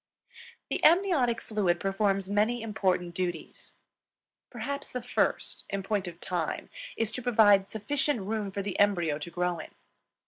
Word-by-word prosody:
The - - -1
amniotic 320 -9 +4
fluid 190 -6 0
performs 195 -1 0
many 215 +4 +1
important 185 -5 0
duties. 175 -2 -5 0.7
Perhaps 280 +4 -5
the 250 -1 -3
first, 245 - -1
in 200 -1 -3
point 200 -1 -1
of 170 -1 -8
time, 175 -4 -3 0.3
is 225 -1 0
to 255 - -5
provide 210 -5 +4
sufficient 280 +3 0
room 210 +1 -2
for 200 +1 -3
the 195 -2 -4
embryo 175 -7 +2
to 155 - -6
grow 175 -1 -1
in. - - -8
205 Hz, 145 wpm, -29 LUFS, 185-230 Hz, 0.7 s, amniotic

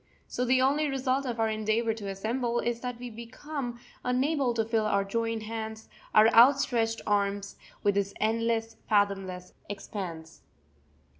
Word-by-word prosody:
So 250 - -2
the 255 +1 +3
only 290 +3 +2
result 270 0 0
of 235 -2 -3
our 225 - +3
endeavour 220 +1 0
to 215 -2 -7
assemble 235 +5 -1
is 235 -1 -1
that 245 -1 -4
we 245 0 -7
become 240 +2 -6 0.2
unable 260 +1 +1
to 225 -1 +1
fill 220 -1 +1
our 200 -2 +2
joined 225 +2 -2
hands, 220 0 -6 0.3
our 215 +1 +8
outstretched 235 -2 +4
arms, 200 -1 0 0.3
with 205 - +3
this 200 0 -1
endless, 225 +1 0
fathomless 195 -3 0 0.2
expanse. 180 -5 -6
225 Hz, 145 wpm, -29 LUFS, 205-245 Hz, 0.3 s, our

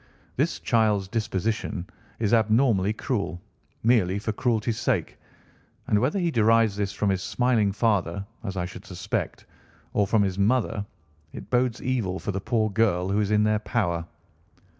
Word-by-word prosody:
This - - 0
child's 105 -4 +2
disposition 110 -3 -2 0.3
is 110 -1 0
abnormally 110 -2 +3
cruel, 110 -5 -2 0.4
merely 110 -5 +3
for 110 +2 -2
cruelty's 115 0 0
sake, 110 - -1 0.7
and 105 - +2
whether 130 - +1
he 175 -3 +1
derives 115 -3 +3
this 100 -1 -1
from 105 -2 0
his 95 -1 -1
smiling 120 -4 +1
father, 100 -3 0 0.2
as 95 -3 -4
I 90 - -1
should 90 - -9
suspect, - - -4 0.5
or 100 -1 +2
from 105 0 +3
his 95 0 -2
mother, 110 0 +1 0.5
it - - -9
bodes 125 -1 +1
evil 115 -8 -1
for 100 - -3
the 95 0 -3
poor 110 -1 0
girl 100 -4 +1
who 100 +2 +1
is 105 -2 0
in 105 0 +3
their 105 0 +2
power." 85 -7 -1
105 Hz, 160 wpm, -25 LUFS, 100-115 Hz, 0.7 s, abnormally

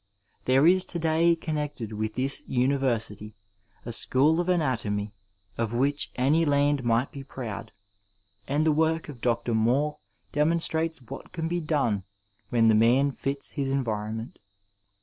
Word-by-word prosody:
There 130 +3 +4
is 185 +2 +5
to 175 - -5
day 165 +1 +3
connected 150 -8 -4
with 110 0 -3
this 135 +2 +1
university 125 -5 0 0.5
a 120 - -4
school 145 +8 +3
of 175 +1 -1
anatomy 115 - 0 0.5
of 115 0 -1
which 140 +4 +1
any 145 +6 +3
land 145 -2 +2
might 120 +2 +1
be 140 -2 -8
proud, 110 -5 -7 0.8
and 145 +3 +1
the 160 - +4
work 160 +1 +1
of 130 -5 -10
Dr. 115 -1 0
Mall 125 +7 +1 0.3
demonstrates 160 0 +1
what 115 - -10
can 165 -2 -3
be 175 +1 -1
done 140 - 0 0.5
when 115 -2 +3
the 110 - +6
man 120 +6 +4
fits 140 +1 -3
his 140 -3 -2
environment. 110 -3 -3
135 Hz, 145 wpm, -27 LUFS, 115-155 Hz, 0.8 s, the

